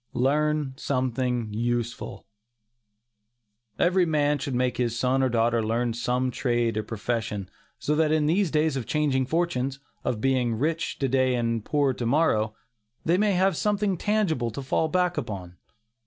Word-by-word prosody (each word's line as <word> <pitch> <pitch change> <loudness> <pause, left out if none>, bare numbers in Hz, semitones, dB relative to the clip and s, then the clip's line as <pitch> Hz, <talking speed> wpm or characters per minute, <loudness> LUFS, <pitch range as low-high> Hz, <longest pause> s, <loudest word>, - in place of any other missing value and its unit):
LEARN 150 +2 +1
SOMETHING 125 -4 -1
USEFUL. 120 +1 -3 1.5
Every 180 +1 +3
man 150 -2 +2
should 135 -1 -3
make 125 0 0
his 120 -2 0
son 130 +2 +2
or 130 - +2
daughter 115 0 +2
learn 115 +2 0
some 125 +2 0
trade 120 -3 0
or 110 - 0
profession, 110 -2 -3 0.3
so 150 - -1
that 155 0 +2
in 155 -1 +2
these 180 +4 +2
days 155 -1 +1
of 130 -5 -4
changing 140 -4 +1
fortunes 140 -4 -1 0.2
of 115 - -1
being 125 -2 +1
rich 165 +7 -1
to 135 - 0
day 130 0 +2
and 115 -2 -1
poor 145 -1 +1
to 120 - -4
morrow, 110 -7 +2 0.5
they 175 +3 +3
may 210 -1 +3
have 190 0 +2
something 205 +1 +1
tangible 180 - 0
to 135 +5 -6
fall 160 +4 +1
back 180 +1 +1
upon. 90 -4 -7
130 Hz, 155 wpm, -26 LUFS, 120-155 Hz, 1.5 s, Every